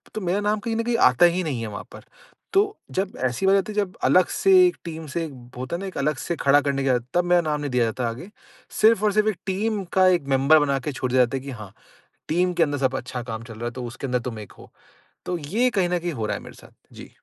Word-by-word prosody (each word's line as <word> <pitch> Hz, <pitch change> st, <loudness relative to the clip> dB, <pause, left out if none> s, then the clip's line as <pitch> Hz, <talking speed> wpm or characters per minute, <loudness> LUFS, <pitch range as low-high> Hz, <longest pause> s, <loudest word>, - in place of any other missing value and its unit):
तो 215 Hz, -, -3 dB
मेरा 185 Hz, +2 st, 0 dB
नाम 210 Hz, +1 st, 0 dB
कहीं 225 Hz, +2 st, -3 dB
न 230 Hz, -, 0 dB
कहीं 235 Hz, 0 st, 0 dB
आता 125 Hz, -, +5 dB
ही 175 Hz, +1 st, +2 dB
नहीं 140 Hz, -8 st, -3 dB
है 115 Hz, -, -4 dB
वहाँ 100 Hz, -1 st, -7 dB
पर। -, -, -11 dB, 0.5 s
तो 390 Hz, -, +6 dB, 0.3 s
जब 190 Hz, 0 st, -2 dB
ऐसी 125 Hz, +8 st, -1 dB
बात 195 Hz, -, +5 dB
आती 195 Hz, +2 st, -2 dB
है -, -, -13 dB
जब 200 Hz, -3 st, -1 dB
अलग 185 Hz, -1 st, +5 dB
से 390 Hz, -, +1 dB, 0.2 s
एक 355 Hz, -, -2 dB
टीम 160 Hz, -1 st, -6 dB
से 165 Hz, +4 st, -2 dB, 0.3 s
होता 130 Hz, +6 st, -4 dB
है -, -, -4 dB
ना -, -, -5 dB
एक 190 Hz, -, -8 dB
अलग 150 Hz, +2 st, 0 dB
से 170 Hz, -, -3 dB
खड़ा 140 Hz, +1 st, +5 dB
करने 140 Hz, -1 st, -1 dB
की 135 Hz, -, +1 dB
बात 125 Hz, -2 st, +1 dB
तब 175 Hz, -, +3 dB
मेरा 175 Hz, 0 st, +4 dB
नाम 150 Hz, -2 st, -2 dB
नहीं 145 Hz, -2 st, -3 dB
दिया 125 Hz, -2 st, +2 dB
जाता 115 Hz, +1 st, -2 dB
आगे, 125 Hz, -, -8 dB, 0.5 s
सिर्फ़ 220 Hz, -1 st, +5 dB
और 210 Hz, -, +3 dB
सिर्फ़ 215 Hz, +1 st, +3 dB
1 205 Hz, -, -3 dB
टीम 205 Hz, +2 st, -1 dB
का 190 Hz, -1 st, +5 dB
1 175 Hz, -6 st, +2 dB
मेंबर 140 Hz, +4 st, +5 dB
बना 140 Hz, -2 st, +1 dB
के 140 Hz, +3 st, -4 dB
छोड़ 130 Hz, -2 st, -3 dB
दिया 130 Hz, 0 st, +4 dB
जाता 130 Hz, +3 st, -4 dB
है 130 Hz, -, -7 dB
कि 140 Hz, -, -6 dB
हाँ 100 Hz, -2 st, -10 dB, 0.6 s
टीम 180 Hz, +3 st, +1 dB
के 175 Hz, -1 st, +3 dB
अंदर 145 Hz, -2 st, -1 dB
सब 130 Hz, -1 st, 0 dB
अच्छा 130 Hz, -1 st, -6 dB
काम 115 Hz, -2 st, -6 dB
चल 115 Hz, -1 st, -10 dB
रहा 115 Hz, +2 st, -6 dB
है 120 Hz, -, -2 dB
तो 125 Hz, +1 st, -7 dB
उसके 120 Hz, +3 st, -6 dB
अंदर 125 Hz, -1 st, 0 dB
तुम 115 Hz, -2 st, -8 dB
1 105 Hz, -, -10 dB
हो। -, -, -15 dB, 0.5 s
तो 180 Hz, -, -2 dB
ये 200 Hz, +12 st, 0 dB
कहीं 190 Hz, -6 st, 0 dB
न 180 Hz, 0 st, 0 dB
कहीं 170 Hz, 0 st, -3 dB
हो 115 Hz, -6 st, -3 dB
रहा -, -, -1 dB
है -, -, -10 dB
मेरे -, -, -12 dB
साथ। -, -, -16 dB, 0.2 s
जी। -, -, -11 dB
155 Hz, 290 wpm, -23 LUFS, 130-190 Hz, 0.6 s, तो